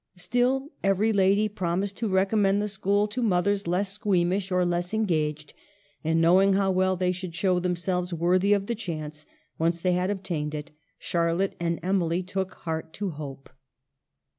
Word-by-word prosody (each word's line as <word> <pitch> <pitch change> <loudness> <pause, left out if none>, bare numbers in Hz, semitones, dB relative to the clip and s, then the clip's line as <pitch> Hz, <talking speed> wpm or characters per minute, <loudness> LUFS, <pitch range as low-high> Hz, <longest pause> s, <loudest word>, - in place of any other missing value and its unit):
Still, 245 - 0
every 195 +3 +2
lady 200 +2 +3
promised 190 0 -2
to 225 - -1
recommend 195 +1 +2
the 210 - -1
school 205 +1 +1
to 250 +4 -3
mothers 200 -2 +1
less 190 +3 0
squeam 185 -5 +1
ish, 195 0 -2
or 180 0 +2
less 175 +3 -1
engaged; 155 -8 -1 0.5
and, 160 +1 +1
knowing 185 +4 +5
how 195 0 +2
well 185 0 +2
they 180 0 0
would 180 -3 -6
show 180 +1 +2
themselves 180 0 -1
worthy 180 +4 +2
of 200 -1 +1
the 235 - -1
chance, 155 -8 -6 0.3
once 165 +1 +1
they 180 +1 +1
had 180 +1 0
obtained 170 -7 -3
it, 150 0 -6 0.3
Charlotte 170 +3 0
and 170 -1 -1
Emily 180 -2 +1
took 190 +1 -3
heart 160 -1 -5
to 200 -2 -3
hope. 140 -3 -8
185 Hz, 165 wpm, -26 LUFS, 170-200 Hz, 0.5 s, knowing